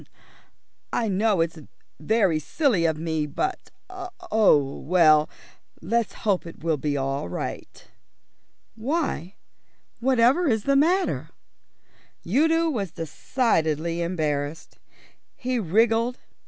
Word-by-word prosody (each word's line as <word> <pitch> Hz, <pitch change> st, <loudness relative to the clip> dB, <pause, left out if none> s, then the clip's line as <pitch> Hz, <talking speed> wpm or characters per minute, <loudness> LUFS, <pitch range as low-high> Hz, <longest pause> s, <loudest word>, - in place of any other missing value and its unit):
"I 225 Hz, -2 st, 0 dB
know 200 Hz, -1 st, +2 dB
it's 165 Hz, 0 st, -2 dB, 0.4 s
very 190 Hz, -2 st, +2 dB
silly 210 Hz, -, +1 dB
of 160 Hz, -1 st, +1 dB
me 160 Hz, -1 st, -2 dB
but 370 Hz, -, -3 dB, 0.2 s
oh, 360 Hz, -, +1 dB
well, 155 Hz, -2 st, +4 dB, 0.5 s
let's 230 Hz, +6 st, -1 dB
hope 195 Hz, -5 st, +1 dB
it 165 Hz, -, -12 dB
will 165 Hz, -2 st, +1 dB
be 145 Hz, 0 st, -2 dB
all 135 Hz, -7 st, -2 dB
right." -, -, -6 dB, 0.9 s
"Why, 225 Hz, -, -2 dB, 0.6 s
whatever 260 Hz, +6 st, +3 dB
is 220 Hz, -5 st, +1 dB
the 275 Hz, +3 st, +2 dB
matter?" 350 Hz, +7 st, +2 dB, 1.0 s
Udo 320 Hz, -, +2 dB
was 205 Hz, -9 st, -2 dB
decidedly 165 Hz, -, -1 dB
embarrassed. 155 Hz, -3 st, -3 dB, 0.6 s
He 255 Hz, -1 st, -2 dB
wriggled. 225 Hz, +5 st, +2 dB
195 Hz, 100 wpm, -24 LUFS, 160-250 Hz, 1.0 s, well